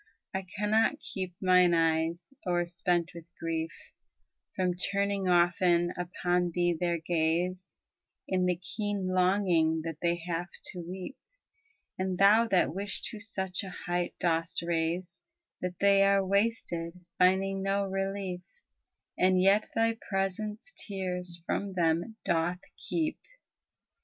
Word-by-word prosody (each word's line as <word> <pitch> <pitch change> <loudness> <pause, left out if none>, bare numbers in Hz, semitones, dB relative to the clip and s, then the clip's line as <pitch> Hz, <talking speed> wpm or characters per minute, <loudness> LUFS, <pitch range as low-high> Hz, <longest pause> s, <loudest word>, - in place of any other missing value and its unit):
I 190 0 -3
cannot 215 +2 +2
keep 185 -2 -5
mine 180 -2 +5
eyes, 165 +4 0
o'erspent 175 -1 0
with 170 -1 -10
grief, 165 -1 -2 0.9
From 185 -1 +1
turning 200 +1 -1
often 175 0 +3
upon 180 0 0
thee 175 -1 +2
their 170 +1 0
gaze, 170 +3 -1 0.3
' - - -61
In 185 -1 +1
the 180 - +2
keen 195 +1 -3
longing 180 -4 +3
that 165 -1 -5
they 170 0 +2
have 175 0 -2 0.2
to 180 - -8
weep: 185 +9 -7 0.8
And 185 -1 -1
thou 210 +4 +6
that 180 -8 +2
wish 195 +2 -4
to 215 - -7
such 190 -4 -3
a 195 - -6
height 175 -1 -3
dost 165 0 0
raise 170 +1 -1 0.4
That 180 -1 -3
they 200 0 +5
are 195 0 +4
wasted, 185 -4 -1 0.2
finding 190 +1 +3
no 195 +1 +1
relief, 195 -1 -3 0.8
And 185 0 +4
yet 195 +3 +4
thy 225 0 +2
presence 210 - -2
tears 180 - -5
from 200 +1 -2
them 170 +4 +1
doth 175 +2 0
keep. 315 -2 -2
180 Hz, 125 wpm, -30 LUFS, 175-195 Hz, 0.9 s, thou